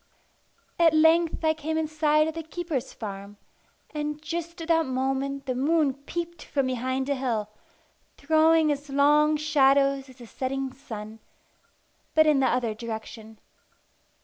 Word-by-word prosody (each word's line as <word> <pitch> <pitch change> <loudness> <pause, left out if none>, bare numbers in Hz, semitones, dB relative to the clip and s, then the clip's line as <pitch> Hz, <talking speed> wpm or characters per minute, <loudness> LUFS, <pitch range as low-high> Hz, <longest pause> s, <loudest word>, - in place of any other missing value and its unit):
At 330 -2 +5
length 320 +1 +3
I 315 - +4
came 315 +1 -3
in 320 -1 0
sight 305 0 +2
of 320 - -3
the 330 - -5
keeper's 320 -4 -4
farm; 200 -1 -8 0.6
and 300 0 -3
just 335 +2 -5
at 330 - -6
that 325 -2 +3
moment 270 +1 -2
the 255 - -1
moon 290 +2 +2
peeped 335 +4 -6
from 275 -2 -1
behind 260 +1 -2
a 285 - +1
hill, 235 -6 -2 0.7
throwing 315 +1 +3
as 285 0 -4
long 295 +2 +4
shadows 275 -2 +2
as 260 - -14
the 245 - -11
setting 265 +2 -4
sun, 220 -4 -9 1.0
but 315 0 +6
in 300 -3 +4
the 265 - +3
other 240 -3 0
direction. 220 0 -8
280 Hz, 145 wpm, -26 LUFS, 260-315 Hz, 1.0 s, but